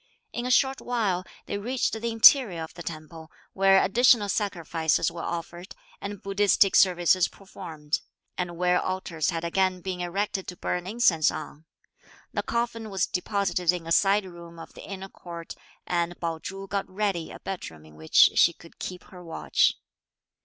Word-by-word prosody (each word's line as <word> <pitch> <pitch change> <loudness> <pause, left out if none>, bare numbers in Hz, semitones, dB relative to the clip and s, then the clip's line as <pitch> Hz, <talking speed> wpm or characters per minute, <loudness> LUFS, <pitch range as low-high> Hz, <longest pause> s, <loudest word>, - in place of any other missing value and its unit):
In 240 +1 -3
a - - -2
short 265 +1 +3
while, 210 -7 -1 0.2
they 200 - -4
reached 245 +5 -1
the 225 +1 -2
interior 225 - +6
of 160 - -9
the 175 - -10
temple, 160 -1 -8 0.2
where 195 0 +5
additional 230 0 +4
sacrifices 170 -6 0
were 170 0 -7
offered 170 +3 -6 0.3
and 200 0 -6
Buddhistic 200 0 +3
services 180 -1 +4
performed; 155 -6 -5 0.4
and 175 -2 -4
where 180 0 +2
altars 185 -4 -2
had 165 -2 -3
again 185 +2 +1
been 185 0 -4
erected 190 +2 -2
to 180 - -7
burn 180 0 -3
incense 190 -8 +3
on. 155 +2 -7 0.7
The - - 0
coffin 230 -2 -3
was 195 -2 0
deposited 180 -2 0
in 175 -2 -5
a 165 - -6
side 200 +3 +4
room 170 -2 -11
of 165 - -11
the - - -11
inner 195 -1 -7
court; 170 -3 -9 0.3
and 175 0 -1
Pao 165 -1 -3
Chu 195 +4 -7
got 195 0 -3
ready 190 -4 -2
a - - -10
bed 195 -2 -5
room 80 -1 -16
in 80 - -16
which 80 +1 +5
she 170 - +5
could 165 0 -17
keep 180 -1 -6
her 180 -1 -13
watch. 165 -1 +1
180 Hz, 170 wpm, -26 LUFS, 170-200 Hz, 0.7 s, interior